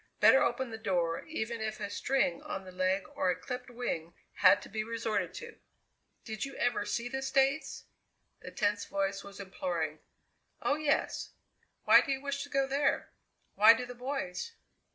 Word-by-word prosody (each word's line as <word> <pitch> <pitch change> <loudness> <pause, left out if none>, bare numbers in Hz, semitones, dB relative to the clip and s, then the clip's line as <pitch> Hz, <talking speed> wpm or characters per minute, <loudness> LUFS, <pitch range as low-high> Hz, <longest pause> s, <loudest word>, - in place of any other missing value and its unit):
Better 265 - +7
open 240 +1 0
the 220 - -6
door 175 -6 0
even 235 -7 -4
if 215 0 -3
a 205 - -3
string 230 -5 0
on 195 - -5
the 185 - -9
leg 185 +1 +1
or 185 - +1
a 180 - +2
clipped 250 +8 -6
wing 175 -9 -4 0.2
had 200 - +7
to - - -10
be 215 +1 -3
resorted 225 -1 -2
to! 470 -1 -9 0.7
"Did 220 -3 -4
you 275 - -5
ever 225 -4 0
see 235 +3 -1
the 265 +2 -3
States?" 270 +2 +1 0.6
The - - -9
tense 205 -1 0
voice 195 0 -2
was 200 0 -11
imploring. 170 -5 -3 0.6
"Oh, - - +1
yes. 300 -1 0 0.5
Why - - +8
do 275 - -3
you 270 - 0
wish 280 0 -3
to 285 - -6
go 275 -1 +2
there?" 275 +1 0 0.4
"Why 215 +3 +8
do 250 - -4
the 245 - -8
boys?" 255 - -4
225 Hz, 175 wpm, -31 LUFS, 195-270 Hz, 0.7 s, Why